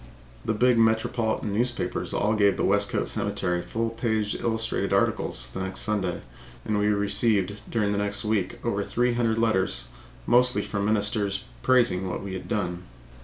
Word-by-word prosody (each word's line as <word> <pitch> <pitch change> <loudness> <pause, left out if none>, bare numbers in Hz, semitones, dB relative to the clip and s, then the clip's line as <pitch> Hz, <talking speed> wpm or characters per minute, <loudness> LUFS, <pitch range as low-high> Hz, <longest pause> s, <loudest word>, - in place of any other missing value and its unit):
The 110 - -1
big 125 +1 +3
metropolitan 110 -1 +1
newspapers 120 +4 -1
all 105 +1 +1
gave 100 -2 +3
the - - +1
Westcote 100 +1 +1
Cemetery 90 0 -1
full 115 +4 -2
page 110 -2 -1
illustrated 115 -1 -1
articles - - 0
the - - -5
next 95 0 -3
Sunday, 100 -5 -1 0.4
and 105 -1 0
we 105 - +2
received 100 -1 +1
during 105 -3 0
the 100 - 0
next 100 +1 -1
week 105 -4 0
over 100 -3 0
three 120 +4 +1
hundred 115 -2 +1
letters, 95 - +1 0.4
mostly 125 +1 +3
from 100 -1 -2
ministers, 105 -1 0 0.2
praising 120 -8 +2
what 90 - -4
we 100 -1 -5
had 95 - -6
done. 90 -4 -2
105 Hz, 160 wpm, -26 LUFS, 100-115 Hz, 0.4 s, big